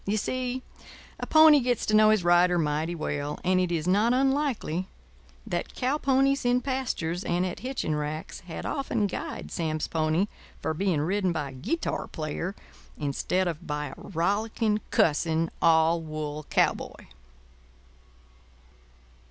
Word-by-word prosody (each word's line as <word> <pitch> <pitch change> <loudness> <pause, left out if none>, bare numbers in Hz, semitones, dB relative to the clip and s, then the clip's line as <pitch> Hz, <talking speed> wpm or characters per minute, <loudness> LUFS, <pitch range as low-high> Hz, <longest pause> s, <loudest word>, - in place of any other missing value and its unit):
You 210 +2 +1
see, 255 +3 -2 0.6
a - - -4
pony 315 -2 +7
gets 245 -3 0
to 215 - -1
know 215 0 +7
his 215 -4 +3
rider 175 +1 +4
mighty 155 +1 0
well, 145 -2 -3
and 185 0 +3
it 180 -1 0
is 165 -1 -1
not 210 +6 +3
unlikely 265 - 0 0.6
that 175 - -4
cow 265 +4 0
ponies 275 0 +2
in 245 0 +2
pastures 235 - -2
and 175 +1 0
at 180 - -4
hitching 255 -11 -2
racks 150 +1 -4
had 170 -3 -8
often 255 -7 -1
guyed 200 - -5
Sam's 155 -2 -2
pony 160 +3 +1 0.3
for 160 - -2
being 175 -2 0
ridden 185 +3 +1
by 150 -4 -3
a - - -12
guitar 140 - -2
player 160 +5 -4 0.4
instead 155 +6 -1
of 170 0 -5
by 150 -1 -3
a - - -10
rollicking, 210 +4 -1
cussing, 160 +1 +2
all 165 0 +4
wool 155 -1 -5
cowboy. - - 0
180 Hz, 145 wpm, -27 LUFS, 160-230 Hz, 0.6 s, pony